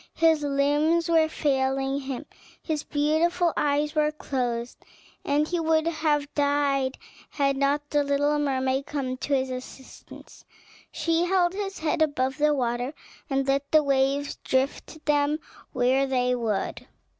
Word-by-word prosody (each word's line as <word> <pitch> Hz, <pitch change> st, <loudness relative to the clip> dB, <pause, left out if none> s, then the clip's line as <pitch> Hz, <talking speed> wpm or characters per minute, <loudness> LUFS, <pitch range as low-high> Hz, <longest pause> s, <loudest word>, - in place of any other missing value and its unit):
His 325 Hz, -2 st, +3 dB
limbs 290 Hz, +4 st, +1 dB
were 320 Hz, -1 st, +4 dB
failing 270 Hz, -2 st, 0 dB
him, 270 Hz, +1 st, -5 dB, 0.3 s
his 310 Hz, -3 st, -3 dB
beautiful 320 Hz, +4 st, +1 dB
eyes 295 Hz, +1 st, +1 dB
were 300 Hz, -1 st, +2 dB
closed, 245 Hz, -5 st, -3 dB, 0.4 s
and 295 Hz, +2 st, +1 dB
he 350 Hz, +1 st, -1 dB
would 320 Hz, -1 st, +2 dB
have 305 Hz, -3 st, 0 dB
died 285 Hz, -2 st, +1 dB, 0.3 s
had 275 Hz, -1 st, 0 dB
not 285 Hz, +2 st, 0 dB
the 290 Hz, -1 st, +2 dB
little 290 Hz, +1 st, +1 dB
mermaid 265 Hz, -1 st, 0 dB
come 265 Hz, -3 st, -3 dB
to 280 Hz, +2 st, -1 dB
his 260 Hz, -1 st, -1 dB
assistance. 255 Hz, +1 st, -11 dB, 0.5 s
She 330 Hz, +2 st, 0 dB
held 355 Hz, -1 st, +2 dB
his 390 Hz, -1 st, -4 dB
head 315 Hz, 0 st, -1 dB
above 275 Hz, -2 st, 0 dB
the 300 Hz, 0 st, +4 dB
water, 245 Hz, +2 st, -2 dB, 0.3 s
and 270 Hz, -1 st, 0 dB
let 275 Hz, +1 st, 0 dB
the 310 Hz, -1 st, +5 dB
waves 275 Hz, +1 st, +1 dB
drift 275 Hz, +4 st, -2 dB
them 295 Hz, 0 st, +2 dB, 0.3 s
where 260 Hz, +2 st, +2 dB
they 250 Hz, -1 st, +1 dB
would. 225 Hz, -5 st, -2 dB
285 Hz, 140 wpm, -26 LUFS, 270-310 Hz, 0.5 s, the